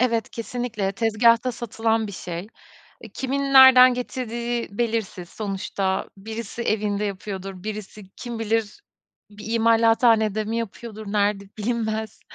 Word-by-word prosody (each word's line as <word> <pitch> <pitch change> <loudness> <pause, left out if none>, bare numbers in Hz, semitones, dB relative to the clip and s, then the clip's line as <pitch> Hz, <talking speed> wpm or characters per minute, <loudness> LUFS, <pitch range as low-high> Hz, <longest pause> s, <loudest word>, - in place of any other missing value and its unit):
Evet, 230 -3 +1
kesinlikle 230 -4 -3
tezgahta 230 +3 +3
satılan 225 -1 -1
bir 200 - -8
şey. 175 +1 -6 0.7
Kimin 270 +1 -2
nereden 255 -1 +9
getirdiği 240 -1 -3
belirsiz. 220 -7 -2
Sonuçta 195 -2 -3
birisi 225 +3 -6
evinde 210 -2 0
yapıyordur, 195 -1 -6
birisi 215 -1 -7
kim 235 -2 -6
bilir, 225 - -1 0.5
bir 210 +2 -8
imalathanede 225 -1 +3
mi 225 +2 -3
yapıyordur, 220 -1 -6
nerede 205 -1 +1
bilinmez. 220 -1 -2
220 Hz, 110 wpm, -23 LUFS, 205-235 Hz, 0.7 s, nereden